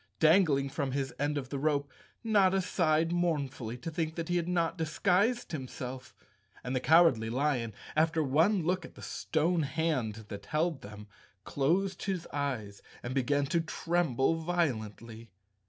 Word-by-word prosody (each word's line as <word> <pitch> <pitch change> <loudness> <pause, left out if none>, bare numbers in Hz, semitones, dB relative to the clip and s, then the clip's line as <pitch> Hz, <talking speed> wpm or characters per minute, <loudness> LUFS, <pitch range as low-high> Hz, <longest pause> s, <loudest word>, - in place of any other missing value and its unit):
Dangling 155 -4 +4
from 135 -2 -2
his 135 -1 -2
end 145 +1 0
of 130 -2 -4
the 140 - -3
rope, 140 -1 0 0.3
Notta 195 -4 +3
sighed 165 -3 +1
mournfully 140 -9 -1
to 165 +7 -6
think 160 0 -3
he 175 - +2
had 170 -1 -1
not 170 -1 0
disguised 185 +8 +1
himself, 130 -3 -6 0.5
and 125 +1 -3
the - - +2
Cowardly 145 -7 +4
Lion, 125 -2 0 0.2
after 160 +1 +2
one 165 +8 +3
look 180 +2 0
at - - -12
the - - -12
stone 165 +2 0
hand 130 -8 -1
that 100 0 -8
held 155 -1 0
them, 105 +1 -10 0.4
closed 180 - 0
his 185 -3 -2
eyes 125 -9 -3 0.2
and 120 - -4
began 140 +2 +1
to 165 +4 +1
tremble 165 -4 0
violently. 115 - -2
155 Hz, 150 wpm, -31 LUFS, 130-170 Hz, 0.5 s, Dangling